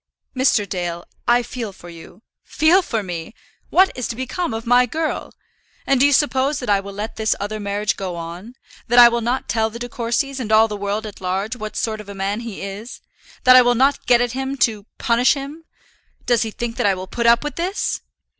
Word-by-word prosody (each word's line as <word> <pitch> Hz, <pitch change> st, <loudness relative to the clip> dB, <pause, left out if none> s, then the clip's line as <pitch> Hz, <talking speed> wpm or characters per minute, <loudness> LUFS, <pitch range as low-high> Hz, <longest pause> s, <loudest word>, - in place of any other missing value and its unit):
"Mr. 255 Hz, -5 st, +2 dB
Dale, 175 Hz, -2 st, -4 dB, 0.2 s
I 240 Hz, 0 st, +4 dB
feel 235 Hz, -4 st, -6 dB
for 180 Hz, -2 st, -14 dB
you 170 Hz, +4 st, -13 dB
" -, -, -66 dB
"Feel 335 Hz, +5 st, +5 dB
for 225 Hz, -, -3 dB
me! 175 Hz, +2 st, -6 dB, 0.3 s
What 380 Hz, +1 st, +4 dB
is 250 Hz, -, -3 dB
to 230 Hz, -, -5 dB
become 260 Hz, +7 st, -3 dB
of 225 Hz, 0 st, -5 dB
my 245 Hz, +1 st, +4 dB
girl? 315 Hz, +5 st, -3 dB, 0.5 s
And 275 Hz, -2 st, +2 dB
do 280 Hz, -, +6 dB
you -, -, +2 dB
suppose 275 Hz, 0 st, +2 dB
that 250 Hz, -7 st, -2 dB
I 200 Hz, -, +4 dB
will 200 Hz, 0 st, -8 dB
let 210 Hz, +3 st, -6 dB
this 220 Hz, 0 st, +1 dB
other 210 Hz, +2 st, -4 dB
marriage 205 Hz, 0 st, -1 dB
go 185 Hz, -3 st, -4 dB
on; 170 Hz, +8 st, -8 dB, 0.3 s
that 240 Hz, -, +1 dB
I 240 Hz, -1 st, +10 dB
will 235 Hz, 0 st, -1 dB
not 245 Hz, +3 st, -1 dB
tell 220 Hz, -1 st, 0 dB
the 225 Hz, -, -9 dB
De 240 Hz, +1 st, -5 dB
Courcys, 245 Hz, +3 st, -2 dB
and 225 Hz, -4 st, -4 dB
all 220 Hz, +1 st, +6 dB
the 210 Hz, -, -5 dB
world 205 Hz, +2 st, -3 dB
at 210 Hz, -3 st, -9 dB
large, 190 Hz, +5 st, -2 dB
what 215 Hz, -3 st, -7 dB
sort 220 Hz, -1 st, -2 dB
of 205 Hz, -, -13 dB
a 200 Hz, -, -8 dB
man 195 Hz, +2 st, -2 dB
this -, -, -7 dB
is; 200 Hz, +3 st, -8 dB, 0.4 s
that 255 Hz, 0 st, +8 dB
I 255 Hz, -, +10 dB
will 245 Hz, 0 st, +3 dB
not 270 Hz, +4 st, +2 dB
get 245 Hz, -1 st, +5 dB
at 245 Hz, -1 st, 0 dB
him 265 Hz, +2 st, -3 dB
to 215 Hz, -2 st, -6 dB
punish 240 Hz, +4 st, +3 dB
him? 290 Hz, +4 st, -8 dB, 0.6 s
Does 240 Hz, -2 st, +2 dB
he 225 Hz, -, -1 dB
think 230 Hz, +2 st, -5 dB
that -, -, +2 dB
I 195 Hz, -, +2 dB
will 185 Hz, 0 st, -6 dB
put 235 Hz, +5 st, -2 dB
up 235 Hz, +2 st, +5 dB
with 295 Hz, -, -4 dB
this?" 365 Hz, +4 st, -2 dB
230 Hz, 230 wpm, -20 LUFS, 205-255 Hz, 0.6 s, I